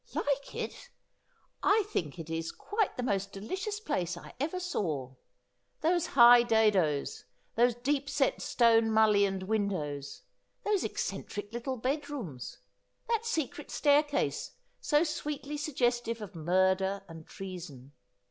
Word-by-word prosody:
' - - -19
Like 280 -1 -1
it! - - -5 0.7
I 420 +2 +4
think 155 - -2
it 165 -2 -7
is 165 0 -3
quite 420 -1 -2
the 250 - -2
most 200 -4 -1
delicious 375 - -4
place 180 - -2
I - - -11
ever 320 +7 -1
saw. 155 - -2 0.7
Those 340 +1 +2
high 240 0 +10
dadoes; 210 - +2 0.3
these 240 +1 +4
deep 275 +3 -1
set 275 -2 +1
stoue 230 -2 +4
mullioned 210 -3 +3
win 205 +1 +1
dows; 145 -7 -5 0.4
those 415 -3 +1
eccentric 205 +1 -4
little 255 +2 -3
bad 285 +5 -2
rooms; 175 - -6 0.5
that 460 0 0
secret 305 - -2
staircase, 290 0 +1 0.3
so 295 +1 +3
sweetly 300 -2 -4
suggestive 240 -6 0
of 210 -4 -8
murder 190 +4 +1
and 165 -2 -11
treason. 170 -9 -8
230 Hz, 130 wpm, -30 LUFS, 185-290 Hz, 0.7 s, high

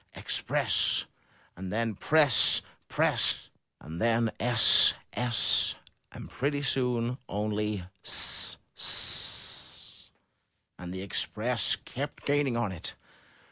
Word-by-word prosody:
Express!' - - -1 0.5
and 95 +1 -8
then 115 0 -2
"Press! 145 +3 +3 0.3
'Press!' - - 0 0.3
and 80 +2 -10
then 115 0 0
*'Ess! 120 -1 +5 0.2
'Ess!' 120 -3 +3 0.4
and - - -11
pretty 145 +1 -4
soon 125 -2 -1
only 105 -1 -4 0.2
*'Ss! - - +1 0.2
'Ss!' - - +1 0.7
And 90 0 -9
the 95 +1 -7
Express 100 - -2
kept 145 +3 -9
gaining 145 -4 -1
on 120 -4 -2
it. 90 - -8
115 Hz, 100 wpm, -27 LUFS, 105-130 Hz, 0.7 s, Ess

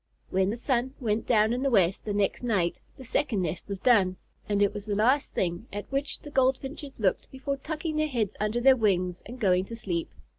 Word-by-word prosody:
When 190 +1 +2
the 215 - -1
sun 255 +1 -1
went 220 -3 -1
down 220 -1 +4
in 250 - -1
the 275 - +2
west 190 -6 +2
the 210 - -2
next 205 -1 0
night 200 -8 0 0.2
the 260 - -10
second 230 -5 0
nest 175 0 -4
was 200 -1 -4
done, 190 -5 +4 0.3
and 205 -1 +1
it 200 - +2
was 205 0 -7
the 205 - 0
last 255 +7 +2
thing 175 +5 -1
at 205 +1 -5
which 275 +2 -2
the 295 - -10
Goldfinches 270 +1 0
looked 195 -4 0
before 275 +1 -3
tucking 310 +2 -4
their 310 0 +2
heads 230 -8 -1
under 210 +3 0
their 265 +2 +6
wings 185 -6 +1
and 245 +3 -9
going 185 -4 +3
to 230 - -7
sleep. 175 -7 -3
225 Hz, 220 wpm, -28 LUFS, 195-265 Hz, 0.3 s, their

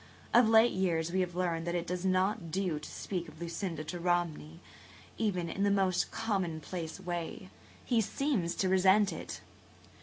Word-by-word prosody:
Of 235 -2 +6
late 225 +1 +6
years 170 -3 0
we 190 - +1
have 180 -2 -1
learned 170 -2 -1
that 175 - -1
it 175 -1 -1
does 180 0 -3
not 190 0 +1
do 180 -3 -1
to 150 - -9
speak 180 -3 -4
of 160 - -13
Lucinda 170 -1 -4
to 175 +3 -5
Romney, 170 -2 -1 0.6
even 185 -6 0
in 190 - -4
the 200 - +4
most 190 -2 +2
commonplace 180 -6 -3
way. 175 +1 -5 0.3
He 235 -3 +3
seems 220 - -1
to 190 - +1
resent 190 +1 +4
it." - - -7
180 Hz, 170 wpm, -32 LUFS, 170-195 Hz, 0.6 s, Of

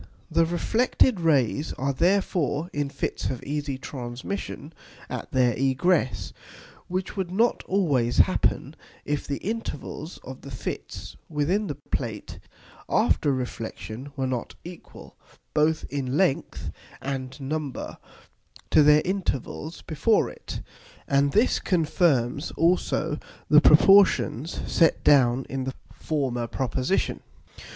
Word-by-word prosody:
The 165 - +3
reflected 220 +5 +2
Rays 145 -2 +1
are 140 +2 -1
therefore 170 -2 +1
in 145 -1 -1
Fits - - -4
of 130 -2 -5
easy 145 -1 -3
Transmission 135 +5 -6 0.4
at - - -5
their 125 -2 +3
egress; 135 +3 +1 0.5
which 185 +1 -3
would 190 -3 -2
not 225 +6 +2
always 140 -12 +1
happen, - - +2 0.3
if 145 0 -2
the 140 - -2
Intervals 185 -7 -5
of 130 0 -9
the 140 - -10
Fits 125 - -6
within 170 +8 0
the 145 - -3 0.2
Plate - - -4 0.5
after 145 - +2
Reflexion 125 0 -5
were 135 -2 -1
not 125 -2 -3
equal, 175 0 -12 0.4
both 155 +1 +2
in 135 -1 -2
length 180 -7 0 0.3
and 135 0 -5
number, 145 0 -4 0.7
to - - +6
their 150 +1 +6
Intervals 170 -4 -3
before 185 +8 +1
it. - - -8 0.5
And 140 +1 +3
this 220 - +3
confirms 155 - +1
also 165 -2 +1 0.3
the 150 0 +8
proportions 170 - +5
set 165 - +2
down 130 -2 +4
in 135 -1 -3
the 130 - -4 0.2
former 130 -6 -2
Proposition. 130 - -1
145 Hz, 115 wpm, -25 LUFS, 130-175 Hz, 0.7 s, the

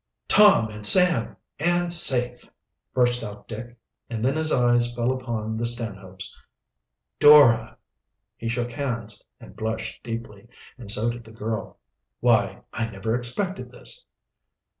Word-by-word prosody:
"Tom 205 - +5
and 105 0 -10
Sam, 170 - +5 0.2
and 175 +2 +1
safe!" 125 -7 +1 0.4
burst 120 -1 +1
out 105 -1 -9
Dick, 120 +2 -9 0.3
and 115 -1 -3
then 135 - +1
his 155 0 +3
eyes 120 -1 +2
fell 120 +1 0
upon 115 -4 -4
the 115 - -3
Stanhopes. 100 -5 -5 0.8
"Dora!" 135 -7 +6 0.6
He 115 - -5
shook 120 +1 -3
hands 115 -5 -4 0.2
and - - -14
blushed 110 0 -5
deeply, 115 -3 -8 0.3
and 120 -5 -12
so 115 +2 +4
did 120 0 -9
the 110 - -15
girl. 110 0 -5 0.4
"Why, - - +1
I 115 0 -2
never 110 +2 -4
expected 180 +11 -1
this!" - - -9
120 Hz, 135 wpm, -24 LUFS, 110-130 Hz, 0.8 s, Dora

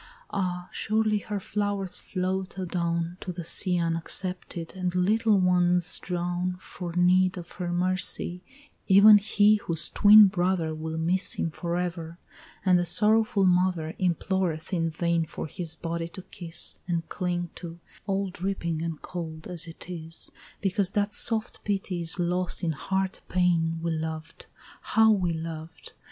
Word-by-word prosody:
Ah! 180 -2 -2
surely 215 0 0
her 205 0 -4
flowers 200 -2 -2
float 185 0 -3
adown 170 -1 -2
To 180 - -5
the 175 -1 -6
sea 180 +2 +3
unaccepted, 170 +1 -2
and 180 -1 -3
little 215 +3 +3
ones 180 -1 +3
drown 180 0 -2
For 180 -2 -8
need 180 +1 +3
of 175 -1 -8
her 175 -2 -4
mercy, 180 0 0 0.5
even 205 +2 +8
he 210 +1 +3
whose 165 -5 +3
twin 210 +1 +8
brother 180 -4 0
Will 160 +1 -5
miss 180 +4 0
him 165 - -2
forever; 170 0 -4 0.5
and 180 -1 +5
the - - +1
sorrowful 215 -1 +2
mother 180 -3 +1
Imploreth 180 -1 -1
in 165 -2 0
vain 170 0 -1
for - - -6
his 160 +1 -6
body 165 0 -4
to 180 +2 -9
kiss 170 -2 -3
And 170 -2 -2
cling 175 -1 -3
to, 170 -1 -8 0.3
all 195 -1 -1
dripping 175 -3 -3
and 165 -2 -4
cold 160 -3 -7
as 175 -1 -7
it 165 - -11
is, 165 -2 -9 0.3
Because 195 -1 +1
that 205 0 0
soft 220 -1 +1
pity 195 -3 -2
is 165 +3 +5
lost 180 0 -1
in 165 - +1
hard 190 +6 -2
pain 170 -3 +1
We 170 - -1
loved, 160 0 -5 0.3
how 220 0 +4
we 185 -5 +1
loved! 160 0 -7
180 Hz, 145 wpm, -26 LUFS, 165-190 Hz, 0.5 s, even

